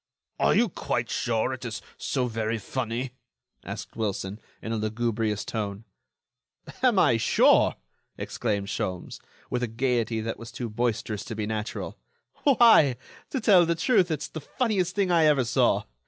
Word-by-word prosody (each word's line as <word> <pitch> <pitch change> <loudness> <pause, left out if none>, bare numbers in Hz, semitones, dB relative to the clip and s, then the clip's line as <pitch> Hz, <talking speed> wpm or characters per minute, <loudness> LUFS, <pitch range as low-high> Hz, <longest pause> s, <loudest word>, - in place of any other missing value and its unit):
"Are - - +3
you 240 - +4
quite 120 - -3
sure 120 +2 0
it 130 -1 -7
is 115 -2 -4 0.2
so 130 -2 -1
very 115 -1 -2
funny?" 120 +3 -3 0.5
asked - - -7
Wilson, 100 -2 -3 0.2
in 110 - -6
a - - 0
lugubrious 110 -1 -1
tone. 105 -1 -4 1.0
"Am - - +4
I - - +5
sure?" - - +4 0.4
exclaimed 100 -4 -2
Sholmes, 90 -2 -4 0.3
with 125 - 0
a 125 - 0
gaiety 115 -1 0
that 115 +1 -4
was 115 -1 -9
too 120 -2 -5
boisterous 110 -2 -1
to 115 - -6
be 105 -1 -2
natural, 110 0 -4 0.4
"why, 230 - +6 0.3
to 265 - -2
tell 200 -6 +6
the 170 - +1
truth, 190 0 +3
it's 155 -2 -2
the 160 - -7
funniest 190 - -1
thing 195 -3 +1
I 165 -2 +5
ever 145 -4 +4
saw. 120 - +2
120 Hz, 155 wpm, -26 LUFS, 110-150 Hz, 1.0 s, why